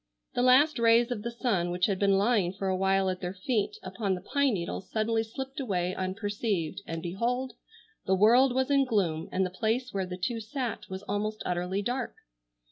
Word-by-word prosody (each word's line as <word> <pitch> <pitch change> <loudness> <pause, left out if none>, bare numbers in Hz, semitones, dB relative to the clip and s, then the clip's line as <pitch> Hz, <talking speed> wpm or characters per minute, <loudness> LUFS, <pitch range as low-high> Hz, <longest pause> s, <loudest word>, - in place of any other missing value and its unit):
The 245 - 0
last 260 +3 +5
rays 235 +1 +4
of 225 -4 -2
the 235 - -3
sun 235 -7 0
which 180 +1 +1
had 195 -3 -1
been 195 -1 +4
lying 200 -4 +2
for 195 0 -3
a 190 - +1
while 195 0 +2
at 185 0 -2
their 180 +1 -4
feet 210 +2 -1
upon 190 +1 -2
the 180 - -7
pine 280 -5 +3
needles 180 +1 -5
suddenly 225 +1 +1
slipped 265 +5 -6
away 185 -8 -1
unperceived, 195 -2 -2
and 165 0 -4
behold! 240 +9 -2 0.5
the 190 - +4
world 240 +7 +5
was 260 +1 +1
in 275 -1 +5
gloom, 190 -11 0
and 190 0 +1
the 185 - -4
place 235 +5 -1
where 190 -2 -1
the 180 0 -5
two 230 +6 -2
sat 245 +2 -4
was 190 +1 -6
almost 215 +1 -2
utterly 180 +3 -1
dark. 245 +3 -2
205 Hz, 200 wpm, -29 LUFS, 185-240 Hz, 0.5 s, last